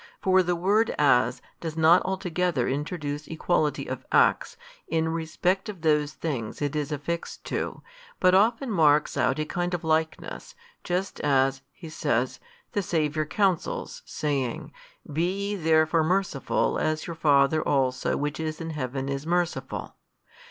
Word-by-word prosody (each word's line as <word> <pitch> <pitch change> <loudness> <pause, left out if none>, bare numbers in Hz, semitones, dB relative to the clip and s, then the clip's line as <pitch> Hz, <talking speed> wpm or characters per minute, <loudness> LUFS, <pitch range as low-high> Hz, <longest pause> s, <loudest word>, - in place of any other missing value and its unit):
For 190 0 +4
the 175 -1 0
word 205 +6 +2
As 125 -3 +3 0.2
does 165 -1 -5
not 165 +3 +6
altogether 180 -7 -1
introduce 145 +1 -3
equality 160 -2 0
of - - -5
acts, - - +3 0.3
in 160 0 0
respect 165 +5 -1
of 195 -5 -7
those 150 -2 +2
things 130 -9 -4
it 145 0 -2
is 150 0 -2
affixed 150 +4 -4
to, - - -4 0.4
but 185 - +4
often 230 +6 +3
marks 155 -5 +3
out 130 - +1
a 155 - -1
kind 175 +2 -2
of 170 - -6
likeness, 160 - -2 0.3
just 180 +2 -2
as 135 -2 +2
(he 165 +3 -11
says) 130 -6 -1 0.3
the 205 - 0
Saviour 155 -3 0
counsels, 190 -1 -1
saying, 135 -5 -3 0.4
Be 185 +6 -1
ye 205 - -1
therefore 160 -2 +3
merciful 180 -5 0
as 155 0 -1
your 170 - -5
Father 145 -1 +3
also 130 -4 +1
which 145 +1 -3
is 155 -1 -3
in 165 -1 -4
Heaven 135 -2 -3
is 140 +2 -3
merciful. 175 0 -2
160 Hz, 145 wpm, -26 LUFS, 145-175 Hz, 0.4 s, not